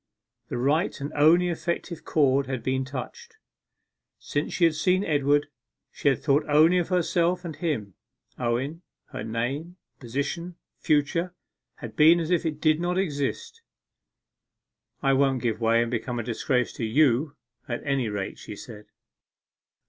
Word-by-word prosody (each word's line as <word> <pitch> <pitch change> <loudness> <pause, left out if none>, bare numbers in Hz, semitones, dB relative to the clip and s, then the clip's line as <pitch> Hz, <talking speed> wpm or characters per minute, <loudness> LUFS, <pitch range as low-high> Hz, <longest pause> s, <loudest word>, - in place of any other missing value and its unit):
The - - -4
right 145 +8 +1
and 140 +1 -5
only 165 +5 +4
effective 170 0 -3
chord 140 -3 +2
had 130 -4 -4
been 130 +1 0
touched. 440 - -8 0.8
Since 145 +1 -3
she 180 - 0
had 165 -2 +5
seen 180 +5 +1
Edward, 145 -3 +2 0.5
she - - -3
had 135 - -1
thought 140 +1 +3
only 160 +5 +5
of 175 - -1
herself 180 0 +1
and 160 -3 -5
him. 135 - -3 0.5
Owen 130 +7 -2 0.3
her - - -5
name 135 +10 -3 0.2
position 140 +8 -4 0.2
future 165 +4 0 0.4
had - - -9
been 160 +3 +6
as 165 +1 -3
if 175 - +3
they 165 - -1
did 155 +1 +1
not 175 +1 -1
exist. 160 - -2 1.4
'I 135 0 +3
won't 135 -2 +2
give 115 -1 -1
way 115 +1 +3
and 120 - -5
become 120 +1 -3
a 120 - -2
disgrace 125 +2 -1
to - - -5
you, 140 +4 +2 0.3
at 120 -1 -4
any 135 -5 0
rate,' 100 -2 -4
she 105 - -8
said. 105 -1 -11
145 Hz, 150 wpm, -26 LUFS, 125-170 Hz, 1.4 s, been